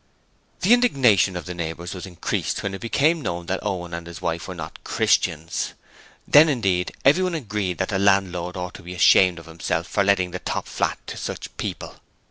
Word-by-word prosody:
The 205 +6 +5
indignation 125 - +4
of 85 - -6
the 90 - -5
neighbours 85 0 -5
was 95 0 -7
increased 90 -3 -3
when 100 - -2
it 95 - -6
became 150 +8 +2
known 85 -8 -4
that 95 +2 -3
Owen 90 -4 -3
and 85 0 -6
his 85 0 -8
wife 85 0 -3
were - - -6
not - - -8
Christians: 80 +2 0 0.5
then 155 +2 +7
indeed 95 -10 0
everyone 180 +5 +4
agreed 105 - -2
that 95 - -1
the 100 -3 0
landlord 95 -3 +1
ought 90 0 -5
to - - -11
be 90 +1 -8
ashamed 90 0 +5
of 85 - -10
himself 80 0 -3
for 100 +2 0
letting 95 -2 +2
the 90 - -5
top - - -3
flat - - -1
to - - -7
such - - -6
people. - - -5
95 Hz, 195 wpm, -23 LUFS, 85-105 Hz, 0.5 s, then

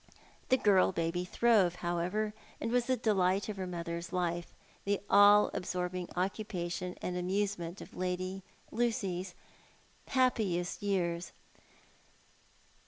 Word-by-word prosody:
The 260 - +5
girl 195 -6 +4
baby 170 0 -1
throve, 200 -4 +3
however, 180 +5 -1 0.3
and 225 - -2
was 245 -1 +2
the 260 -1 +2
delight 195 -3 +2
of 210 - -4
her 185 -1 -3
mother's 170 -1 -5
life, 175 -2 -2 0.3
the 200 0 0
all 205 +1 +7
absorbing 180 0 -3
occupation 180 -2 -3
and 180 - -2
amusement 185 -1 -2
of - - -11
Lady 185 +1 -2 0.3
Lucys 195 -6 -1 0.7
happiest 215 -9 +1
years. 175 -4 -1
185 Hz, 110 wpm, -32 LUFS, 175-205 Hz, 0.7 s, all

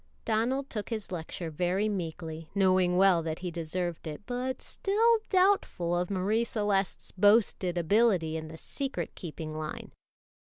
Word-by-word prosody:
Donald 240 +5 0
took 210 -5 -5
his 220 -5 -4
lecture 165 -1 -5
very 180 +6 0
meekly, 165 -4 -4
knowing 185 -2 +3
well 190 -3 +5
that 160 -1 -3
he 175 - -2
deserved 170 0 -3
it, 155 +5 -6
but 250 +1 -3
still 450 +3 +2
doubtful 370 - +2
of 175 0 -1
Marie 200 +4 +1
Celeste's 205 -4 -1
boasted 200 -3 +3
ability 175 -2 +3
in 160 0 -4
the 160 +1 -9
secret 275 - -4
keeping 155 -2 -7
line. 155 0 -5
185 Hz, 140 wpm, -29 LUFS, 165-225 Hz, -, well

